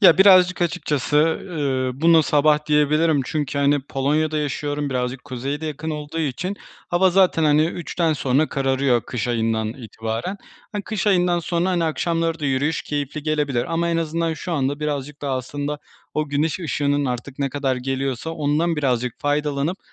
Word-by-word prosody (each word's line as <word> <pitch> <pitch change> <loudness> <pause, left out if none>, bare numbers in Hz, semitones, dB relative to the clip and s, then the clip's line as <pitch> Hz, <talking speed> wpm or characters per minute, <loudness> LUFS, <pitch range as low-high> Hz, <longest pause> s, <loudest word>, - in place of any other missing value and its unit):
Ya, 185 -4 +7
birazcık 185 -2 +6
açıkçası, 150 -4 -1
ııı, 145 -5 0
buna 165 0 +6
sabah 150 0 +3
diyebilirim 150 0 +3
çünkü, 145 -1 -2
hani, 140 0 +3
Polonya'da 150 +3 0
yaşıyorum. 145 0 -2
Birazcık 125 0 -2
kuzeye 135 +4 -4
de 160 - -4
yakın 155 +1 -4
olduğu 150 +1 -5
için, 175 +7 -2 0.3
hava 185 +1 +3
zaten, 180 -3 +3
hani, 150 +1 +4
3'ten 170 -1 -1
sonra 140 +1 +1
kararıyor, 135 -2 +1
kış 120 -1 -4
ayından 110 -2 0
itibaren. 115 - -5 0.4
Hani, 205 -1 -3
kış 215 -1 -3
ayından 180 -3 +3
sonra, 170 +2 0
hani, 175 -2 +1
akşamları 165 0 -1
da - - -3
yürüyüş 140 +4 0
keyifli 145 0 -4
gelebilir 145 -5 0
ama 170 +1 +1
en 170 - +1
azından 165 0 -1
şu 170 +3 -5
anda 145 0 -1
birazcık 145 -1 -3
daha 135 -2 -1
aslında 145 +3 -4 0.4
o 155 -1 -1
güneş 150 +5 0
ışığının, 145 -3 0
artık 125 +2 -4
ne 140 -1 0
kadar 135 -1 -1
geliyorsa, 135 +3 -2
ondan 160 +2 0
birazcık 125 -4 -1
faydalanıp, 145 +4 0
150 Hz, 165 wpm, -22 LUFS, 135-165 Hz, 0.4 s, Ya